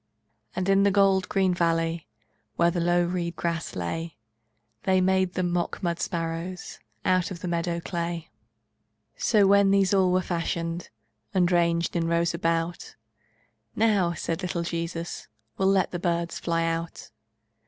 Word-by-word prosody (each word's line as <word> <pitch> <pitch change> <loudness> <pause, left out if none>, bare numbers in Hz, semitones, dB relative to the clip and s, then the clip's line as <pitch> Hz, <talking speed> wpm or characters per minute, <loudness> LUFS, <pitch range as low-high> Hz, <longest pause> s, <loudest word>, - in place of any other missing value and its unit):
And 185 0 -1
in 195 0 +4
the 200 - +5
gold 195 -1 +3
green 190 -2 +2
valley, 165 -2 0 0.5
Where 170 0 +3
low 175 0 +2
the - - -1
reed 175 -1 -2
grass 170 -1 -3
lay, 165 - -4 0.6
They 190 0 +2
made 190 0 +2
them 180 -1 0
mock 175 +1 -2
mud 170 -1 -1
sparrows 165 +1 -4 0.3
Out 185 -1 +2
of 175 -4 -7
the - - -4
meadow 170 0 -1
clay. 170 -1 -4 0.8
So, 210 -4 +3
when 200 0 +5
these 195 -1 +3
all 190 -2 +4
were 185 0 +2
fashioned, 170 0 -3 0.5
And 180 -1 +3
ranged 170 -1 +2
in 165 -1 +1
rows 170 0 +1
about, 165 0 -2 0.8
"Now," 205 -6 +2
said 165 -1 -3
the 185 - -3
little 170 -1 -2
Jesus, 170 0 -4 0.3
"We'll 190 - +3
let 195 -1 +3
the 175 - -3
birds 170 -1 -1
fly 165 -1 0
out." 165 0 -4
175 Hz, 155 wpm, -26 LUFS, 170-185 Hz, 0.8 s, the